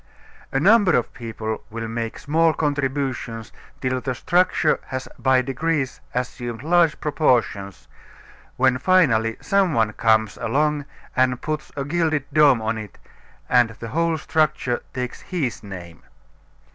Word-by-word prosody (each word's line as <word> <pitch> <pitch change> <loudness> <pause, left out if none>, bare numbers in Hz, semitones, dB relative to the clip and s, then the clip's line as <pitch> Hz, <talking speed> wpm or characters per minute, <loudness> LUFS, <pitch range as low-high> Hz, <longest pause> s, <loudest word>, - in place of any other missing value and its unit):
A 135 - +1
number 200 +1 +5
of 120 - -2
people 110 -2 -5
will 115 +1 -5
make 115 0 -4
small 160 +2 +2
contributions 135 -6 -2 0.3
till 130 -1 -1
the 130 -1 -3
structure 175 0 +2
has 130 0 -5
by 130 -1 +3
degrees 135 +1 -2
assumed 120 -1 -4
large 170 -1 +3
proportions, 120 - 0 0.7
when 130 0 +3
finally 125 -10 +3
some 195 -5 +2
one 110 -1 +2
comes 110 -2 +2
along 150 +4 0 0.3
and 130 -1 +2
puts 155 +1 -4
a 140 -1 -3
gilded 155 -2 0
dome 145 -6 +5
on 110 0 -1
it 105 -2 -9 0.5
and 125 -2 +4
the 115 - -7
whole 165 +2 +1
structure 155 -5 0
takes 125 -1 -5
his 150 - -3
name. 90 -5 -10
130 Hz, 135 wpm, -22 LUFS, 115-155 Hz, 0.7 s, number